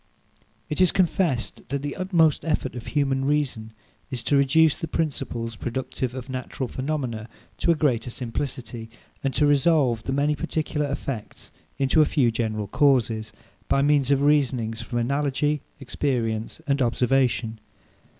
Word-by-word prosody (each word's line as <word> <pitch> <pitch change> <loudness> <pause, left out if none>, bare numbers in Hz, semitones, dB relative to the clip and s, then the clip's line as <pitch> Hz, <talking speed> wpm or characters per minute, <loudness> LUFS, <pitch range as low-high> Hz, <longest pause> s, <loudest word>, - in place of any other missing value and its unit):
It 150 - -1
is 185 - +6
confessed, 170 -8 +1
that 140 +1 -2
the 145 - -3
utmost 170 -5 +2
effort 150 -5 -1
of 120 -2 -8
human 135 -2 +1
reason 135 -6 -1 0.4
is 125 -4 -3
to 145 - +2
reduce 140 +3 +4
the 165 - -5
principles, 130 -7 -2
productive 130 +2 -4
of 130 -1 -6
natural 130 0 -4
phenomena, 130 -5 -3 0.3
to - - 0
a 170 - +6
greater 125 -6 +1
simplicity, 120 -2 -4 0.3
and 135 - +1
to 150 - +3
resolve 145 -5 +3
the 130 - -4
many 145 +2 +1
particular 150 0 -2
effects 130 -5 -5 0.3
into 140 +3 +3
a - - +6
few 130 -7 +2
general 110 -2 -2
causes, 115 -3 +2 0.4
by 140 - +2
means 145 -2 +3
of 140 0 +3
reasonings 130 -6 +2
from 120 +1 -4
analogy, 140 +3 0 0.2
experience, 120 -5 -2
and 140 -1 +1
observation. 125 -2 +1
135 Hz, 145 wpm, -25 LUFS, 120-145 Hz, 0.4 s, is